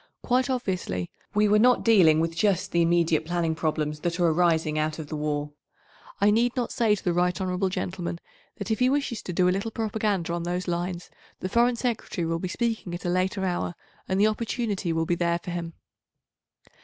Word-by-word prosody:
Quite 255 +2 +1
obviously 185 - -2 0.2
we 210 0 +4
were 210 +1 +4
not 250 +2 +4
dealing 180 -9 +6
with 165 0 -1
just 190 0 +1
the 170 - +2
immediate 170 -2 +2
planning 170 0 0
problems 155 -1 -2
that 170 +2 -2
are 175 - +3
arising 160 -2 +2
out 155 0 -1
of 155 -3 -7
the 155 - -4
war. 150 -1 -2 0.7
I 205 +1 +4
need 235 +3 +2
not 245 -2 -1
say 220 -3 +2
to - - -10
the 175 - +1
right 180 +2 +1
hon. 185 0 0
Gentleman 180 -2 -4 0.4
that 200 +2 -5
if 220 - 0
he 250 0 +4
wishes 270 -5 -1
to - - -6
do 180 +1 +2
a - - +4
little 200 +4 -2
propaganda 210 -6 -1
on 170 - -2
those 180 +2 -3
lines, 175 0 -3 0.3
the 185 - -3
Foreign 240 +3 +3
Secretary 230 -7 -2
will 165 0 -1
be 185 - -3
speaking 220 -3 -2
at 175 - -8
a - - +1
later 185 +2 0
hour 175 -1 -2 0.3
and 190 +1 0
the 205 - +5
opportunity 215 -4 -1
will 165 0 0
be 175 - 0
there 170 0 +1
for 175 - -7
him. 170 -1 -4
180 Hz, 205 wpm, -26 LUFS, 170-210 Hz, 0.7 s, dealing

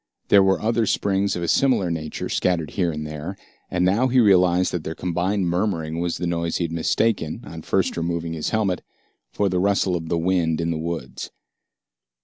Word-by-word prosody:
There 100 - +7
were 95 0 +3
other 115 0 +1
springs 100 0 +1
of 85 - -3
a - - -1
similar 115 -9 +2
nature 80 -2 -4
scattered 85 -4 0
here 90 -4 0
and 75 0 -5
there, 75 +5 -6 0.3
and 90 0 +1
now 105 +8 +3
he 130 0 +3
realized 90 -4 +4
that 85 -3 -3
their 80 - -5
combined 90 +3 -1
murmuring 85 -3 -1
was 85 -1 -1
the 90 - -3
noise 85 -1 -1
he - - -1
had 85 - -3
mistaken, 85 +1 0
on - - -8
first - - 0
removing 85 0 -2
his 80 -2 -2
helmet, 100 -5 0 0.5
for 100 - 0
the 90 -1 0
rustle 100 -1 +2
of 80 -1 -4
the 85 - +1
wind 85 -2 +1
in 85 0 0
the 80 - -2
woods. 80 -6 -5
90 Hz, 195 wpm, -23 LUFS, 85-95 Hz, 0.5 s, There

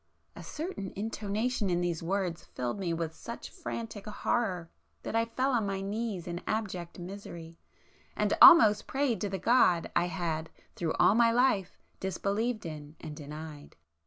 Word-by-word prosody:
A - - -9
certain 305 - -5
intonation 215 +1 -1
in 175 -1 +1
these 175 -2 -1
words 180 -1 -2
filled 125 +10 -4
me 180 -3 -1
with 165 -1 -2
such 235 - -8
frantic 225 -3 -6
horror 195 -5 -1 0.3
that - - -4
I 230 0 +3
fell 255 +4 0
on 230 -5 +1
my 195 -1 -2
knees 200 -2 -3
in 175 0 -5
abject 185 -6 -3
misery, 175 -3 -9 0.6
and - - +1
almost 215 -11 +9
prayed 270 -4 0
to 205 - -1
the 195 - -2
God 185 -5 +3
I 175 - +3
had 160 -2 -3 0.3
through 165 -2 -1
all - - +5
my 230 +1 +5
life 230 -6 +2 0.2
disbelieved 210 +4 -1
in 150 -1 -7
and 150 - -7
denied. 150 0 -9
195 Hz, 160 wpm, -30 LUFS, 170-225 Hz, 0.6 s, almost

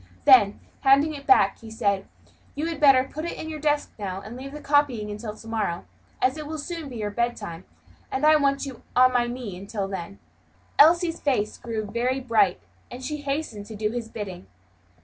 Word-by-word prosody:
Then, 210 -6 +7 0.2
handing 280 +3 +4
it 280 -1 -9
back, 395 - +5
he 225 - -11
said, 200 -3 0 0.5
"You 295 +2 -2
had 330 -3 -3
better 275 -3 +6
put 300 +3 -7
it 340 - -4
in 315 - -6
your 310 -1 -5
desk 295 0 0
now, 190 -2 -4
and 215 +4 -9
leave 265 +2 -8
the 300 - -8
copying 280 -8 +1
until 210 +1 -6
to 225 - -13
morrow, 210 -6 -2 0.4
as 260 +4 +2
it 305 -1 -6
will 315 +1 -4
soon 320 -1 -5
be 250 - -9
your 210 -2 -3
bedtime, 205 -7 -3 0.5
and 270 +3 0
I 310 0 +7
want 275 -1 +2
you 265 -3 -8
on 255 0 +6
my 240 -1 +2
knee 240 -5 -5
until 200 +1 -4
then." 175 - -6 0.6
Elsie's 335 +2 +5
face 250 -7 0
grew 225 -2 -4
very 245 +5 -1
bright, 225 -7 +2 0.3
and 250 +1 -9
she 300 - -3
hastened 275 -8 -4
to 220 - -8
do 215 +1 -1
his 235 -1 -4
bidding. 195 - -7
245 Hz, 200 wpm, -25 LUFS, 210-290 Hz, 0.6 s, Then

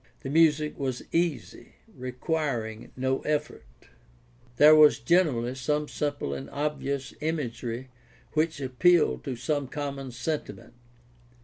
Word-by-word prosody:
The 135 - -5
music 155 -1 +3
was 130 -3 -2
easy, 165 -5 -2 0.2
requiring 125 -4 -3
no 130 +1 0
efTort. 150 0 -2 1.0
There 150 +1 +8
was 155 -1 +7
generally 125 -4 +2
some 150 +3 -1
simple 145 - -3
and 70 0 -6
obvious 140 -2 -3
imagery 130 -5 -3 0.4
which 160 0 0
appealed 150 +6 +3
to 135 -3 -3
some 145 +3 -2
common 140 -1 -5
sentiment. 150 +5 -5
145 Hz, 110 wpm, -27 LUFS, 130-155 Hz, 1.0 s, There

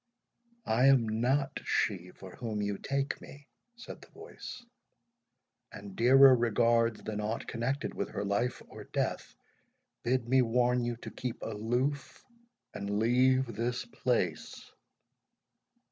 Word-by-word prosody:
"I 125 +4 +3
am 130 -4 +5
not 135 +3 +1
she 90 -3 -1
for 95 0 -12
whom 110 -3 -4
you 100 -1 -2
take 140 0 -2
me," 140 0 -13 0.3
said 240 - -10
the - - -15
voice; 250 -1 -10 1.1
"and 100 -2 -10
dearer 130 +2 +7
regards 115 -1 +2
than 105 -1 -4
aught 110 +2 -3
connected 130 +4 -2
with - - -3
her 100 - -4
life 110 +5 -1
or - - -11
death, - - -3 0.7
bid 120 0 0
me 130 +1 +4
warn 125 +1 +2
you 120 0 -2
to - - -7
keep 125 -2 -5
aloof, 120 +6 -2 0.5
and 100 0 -3
leave 130 +4 +3
this 120 +2 -2
place." 90 -11 -2
120 Hz, 130 wpm, -31 LUFS, 110-130 Hz, 1.1 s, dearer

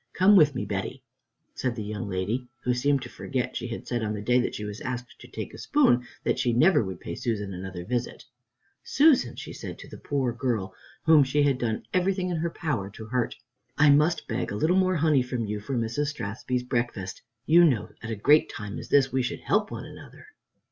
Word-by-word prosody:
Come 190 +3 +5
with 150 -6 +6
me, - - -2
Betty," - - -4 0.5
said 125 -2 -2
the 110 - -4
young 105 -1 -5
lady, 100 +7 -2 0.2
who 125 - +1
seemed 140 +2 +1
to - - -6
forget 130 -2 -3
she - - -3
had 115 - -6
said, 120 -1 -1
on 105 -1 -2
the 105 - -5
day 125 +3 +3
that 125 - -1
she 105 - -5
was 105 +1 -7
asked 125 -1 -5
to - - -12
"take - - -7
a - - -10
spoon," 195 - +3 0.2
that - - 0
she 120 - +1
never 155 +5 +5
would 95 -3 -6
pay - - -6
Susan 105 -6 -3
another 90 -1 -6
visit. 120 +2 -3 0.6
"Susan," 290 -1 +4
she - - -8
said - - -7
to - - -11
the - - -11
poor 135 -4 -1
girl 115 -6 -2 0.3
whom 160 -3 +6
she 145 +2 +1
had 140 -3 +2
done 110 -2 -2
everything 185 0 +1
in 175 - -1
her 170 +2 -1
power 145 - -3
to 110 +2 -10
hurt, 120 +1 -1 0.4
"I 145 0 +6
must 155 +4 +3
beg 115 +1 -2
a - - -3
little 160 - +2
more 185 -1 +3
honey 155 -4 +3
from 125 -2 -3
you 105 0 -3
for 125 +5 -3
Mrs. 120 +6 -1
Strathspey's 125 -1 -3
breakfast. 120 -6 -3 0.2
You 170 +3 +6
know, 110 -9 +2
at 110 - -6
a 115 - -2
great 145 +9 +4
time 105 -1 -6
such - - -4
as - - -9
this, 135 -2 +3
we 130 - +2
should 125 - -3
help - - +1
one - - -6
another." - - -13
125 Hz, 225 wpm, -26 LUFS, 110-150 Hz, 0.6 s, with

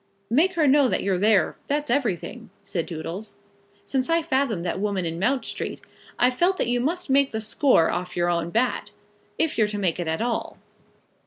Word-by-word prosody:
"Make 330 +10 +3
her 330 -4 +2
know 280 0 +5
that - - 0
you're 190 -2 +1
there; 210 -1 +3
that's 295 -2 -1
everything," 240 - -2
said 195 -4 -3
Doodles. 175 +6 -6 0.5
"Since 265 0 -1
I 330 0 +2
fathomed 265 - 0
that 180 - -2
woman 200 -3 -1
in 165 0 -3
Mount 255 +7 +1
Street, - - -5 0.4
I've 250 +1 +3
felt 355 +8 +2
that - - +1
you 245 0 +1
must 335 +8 -2
make 275 0 +4
the 220 - -3
score 220 - +3
off 180 0 -4
your 175 0 +2
own 170 -1 0
bat, 235 +7 0 0.5
if 320 -7 0
you're 215 - +4
to 210 0 -4
make 185 -4 0
it 175 - -2
at 160 0 -1
all." 235 0 -2
225 Hz, 195 wpm, -24 LUFS, 180-275 Hz, 0.5 s, know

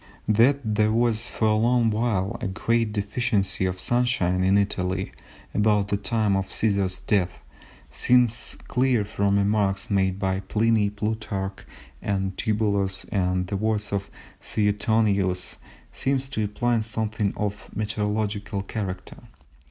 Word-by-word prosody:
That 120 +7 +4
there 105 0 +3
was 115 0 +1
for 110 - 0
a - - +4
long 115 +1 +3
while 105 -4 0
a 115 - -1
great 115 +3 0
deficiency 100 -2 0
of 90 0 -2
sunshine 110 -8 +1
in 95 +2 +4
Italy 95 -2 -1 0.4
about 105 -1 +2
the 100 - +1
time 105 0 +1
of 95 0 -1
Cæsar's 100 -4 0
death 95 -4 0 0.5
seems 125 -2 +2
clear 125 -4 +2
from 100 -1 +1
remarks 100 0 +1
made 95 -1 +2
by 95 -1 0
Pliny, 105 +2 +2
Plutarch, 105 -2 -4 0.3
and 95 -2 -1
Tibullus, 100 -3 0
and 90 -2 +1
the 100 +2 -3
words 105 0 -1
of 100 0 -2 0.3
Suetonius 105 -3 +1 0.3
seem 135 +1 0
to 130 -3 -3
imply 115 +3 0
something 110 -2 -2
of 105 0 -3
a - - -10
meteorological 105 -1 -2
character. 95 -3 -5
105 Hz, 130 wpm, -25 LUFS, 95-110 Hz, 0.5 s, That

